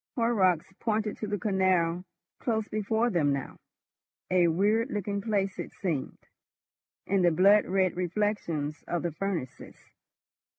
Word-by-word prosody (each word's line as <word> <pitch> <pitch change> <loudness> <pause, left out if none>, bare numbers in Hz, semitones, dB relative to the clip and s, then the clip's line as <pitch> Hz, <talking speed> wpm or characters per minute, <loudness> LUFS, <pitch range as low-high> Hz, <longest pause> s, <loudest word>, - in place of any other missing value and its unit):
Horrocks 195 -9 +2
pointed 215 -2 -1
to 215 - -4
the 205 0 -1
canal 185 -4 +1 0.4
close 220 -3 -1
before 220 +3 0
them 155 -6 +2
now: 140 -1 -4 0.7
a 180 -2 +4
weird 210 - +2
looking 205 -3 -2
place 195 -3 -1
it - - -5
seemed, 160 -9 -3 0.9
in 195 0 +1
the 175 - +5
blood 195 +5 +5
red 185 -1 +1
reflections 175 -5 -2
of 175 -1 -2
the 170 - -1
furnaces. 170 -5 -5
195 Hz, 130 wpm, -28 LUFS, 175-210 Hz, 0.9 s, the